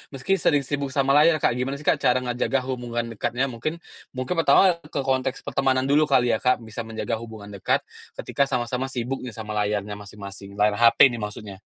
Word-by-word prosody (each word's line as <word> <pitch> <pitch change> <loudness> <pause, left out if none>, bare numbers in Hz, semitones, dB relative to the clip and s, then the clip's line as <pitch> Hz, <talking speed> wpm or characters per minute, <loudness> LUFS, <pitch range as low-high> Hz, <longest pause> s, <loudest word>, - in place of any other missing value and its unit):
meski 190 +9 0
sering 145 -3 +2
sibuk 140 0 -3
sama 135 -1 +2
layar 155 +1 +5
Kak, 120 - +3
gimana 135 +2 -2
sih - - -11
Kak - - +3
cara 125 +1 +3
ngejaga 125 +2 0
hubungan 120 -2 -3
dekatnya? 120 +4 -1
Mungkin 155 +8 -4 0.4
mungkin 130 +6 -2
pertama 170 +4 +5
ke 150 -3 -6
konteks 130 0 -1
pertemanan 130 -1 +1
dulu 150 +2 +4
kali 125 -4 +3
ya 110 - +1
Kak, 125 -1 +3
bisa 110 +1 -6
menjaga 115 +1 -3
hubungan 110 -3 -10
dekat 100 -2 0 0.4
ketika 140 -1 0
sama-sama 125 0 -2
sibuk 125 +2 -3
nih 125 - -7
sama 110 -1 -6
layarnya 105 0 -1
masing-masing, 100 -1 -10
layar 105 0 +2
HP 115 +3 +7
ini 120 - -5
maksudnya? 105 -2 -7
125 Hz, 195 wpm, -24 LUFS, 110-135 Hz, 0.4 s, HP